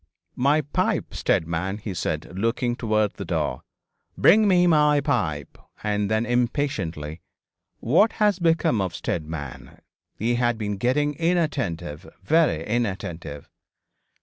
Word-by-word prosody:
'My 140 +4 +3
pipe, 145 - -1
Steadman,' 85 +5 -1
he 105 -2 -6
said, 80 0 -3
looking 115 +4 0
towards 110 -3 0
the - - -4
door; 65 - -2 0.6
'bring 215 0 +6
me 180 -2 +4
my 150 -3 +4
pipe,' 80 - -2 0.2
and 105 -1 0
then, 110 +1 +1
impatiently, 115 - -2 0.6
'What 170 - +3
has 210 -2 +2
become 165 - +2
of 95 -3 -3
Steadman? 75 -4 -5 0.4
He 115 +3 0
has 120 0 +2
been 105 -2 -3
getting 145 +7 +1
inattentive 135 - -1
very 155 - +2
inattentive.' 95 -10 -3
115 Hz, 120 wpm, -24 LUFS, 85-145 Hz, 0.6 s, bring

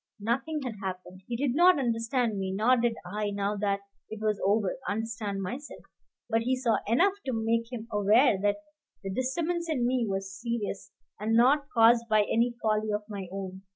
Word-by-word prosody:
Nothing 270 +8 -1
had 240 -5 -5
happened. 185 -1 -6
He 240 - -3
did 265 -1 0
not 355 +4 +6
understand 230 -3 0
me; 190 -1 -2
nor 220 +6 +3
did 235 -1 +1
I, 210 +3 -2
now 200 0 -1
that 200 -1 0 0.3
it 220 - -7
was 215 -1 -1
over, 200 -1 +2
understand 210 -2 -3
myself; 260 +10 -7 0.4
but 225 -1 +1
he 255 +3 +1
saw 250 -3 +1
enough 350 - +4
to 260 - 0
make 230 +1 0
him 230 -2 -6
aware 210 +4 +4
that 205 +9 0 0.4
the 195 - -4
disturbance 330 - -1
in 260 -6 0
me 245 -2 +1
was 195 0 -3
serious, 220 -5 -3 0.3
and 220 +2 0
not 280 +5 +4
caused 230 0 +4
by 215 -1 +5
any 235 +3 +1
folly 215 0 +1
of 210 0 -1
my 200 -3 -5
own. 190 -1 -6
225 Hz, 185 wpm, -28 LUFS, 205-250 Hz, 0.4 s, not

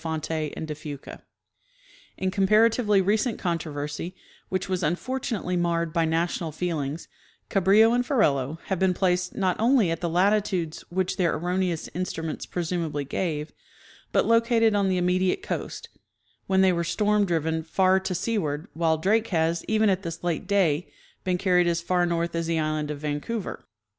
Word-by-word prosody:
Fonte 160 -1 -3 0.3
and 160 - -4
de 155 - -3
Fuca. 145 -2 -9 1.0
In 190 0 -1
comparatively 210 +1 +3
recent 215 +5 +1
controversy, 160 -1 -3 0.3
which 185 0 -2
was 185 -1 -1
un 170 - +2
fortunately 230 -5 -3
marred 170 -2 0
by 165 -1 +2
national 165 0 -1
feelings, 155 -2 -3 0.4
Cabrillo 205 +4 +5
and 245 0 +2
Ferrelo 155 - +1
have 190 -3 -2
been 185 -1 +2
placed 180 -1 0
not 185 -2 +1
only 230 -5 +3
at 165 - -3
the 170 - -1
latitudes 185 -2 +1
which 185 +1 -1
their 175 -4 +2
erroneous 175 0 -1
in 180 +3 -3
struments 160 -3 -5
presumably 165 -4 -2
gave, 150 +1 -3 0.6
but - - +3
located 230 -1 +3
on 200 -2 +2
the 185 - +1
immediate 180 - +1
coast, - - -5 0.6
when 190 0 +3
they 190 -1 +5
were 170 0 0
storm 210 +4 +2
driven 160 -3 0
far 185 +4 +2
to 190 -1 -3
seaward, 170 -7 -2
while 160 -1 +1
Drake 215 +7 +2
has, 165 -2 0
even 220 0 +3
at 190 -1 +2
this 170 -3 -6
late 175 0 -2
day, 180 -6 +1 0.3
been 180 -1 0
carried 180 -1 +3
as 170 -1 +1
far 175 +1 +1
north 170 0 -1
as 165 -1 -2
the 165 -1 0
island 155 -1 -1
of 150 - -3
Vancouver. 150 +9 -4
180 Hz, 165 wpm, -26 LUFS, 160-195 Hz, 1.0 s, Cabrillo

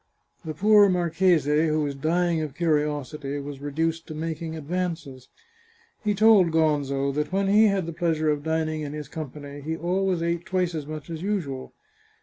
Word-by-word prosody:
The 155 -2 -5
poor 205 +3 +6
marchese, 165 -3 +2
who 155 0 +1
was 145 -1 -2
dying 165 +3 0
of 150 -3 -5
curiosity, 150 -3 -1
was 140 -1 -7
reduced 160 +3 -2
to 155 - -7
making 160 0 -4
advances. 160 -5 -4 0.7
He 210 -1 +1
told 210 -4 +6
Gonzo 145 -4 +1
that 150 +3 -2
when 195 +1 +1
he 210 +2 +6
had 195 -3 +1
the 170 - -5
pleasure 160 -2 +1
of 145 -1 -1
dining 160 0 -1
in 145 -1 -5
his 150 -2 -6
company 145 -1 -7
he 160 +3 -3
always 180 0 0
ate 170 0 -1
twice 180 -2 -1
as 150 -3 -5
much 155 +1 -7
as 160 -1 -5
usual. 170 -10 -3
160 Hz, 170 wpm, -25 LUFS, 150-175 Hz, 0.7 s, poor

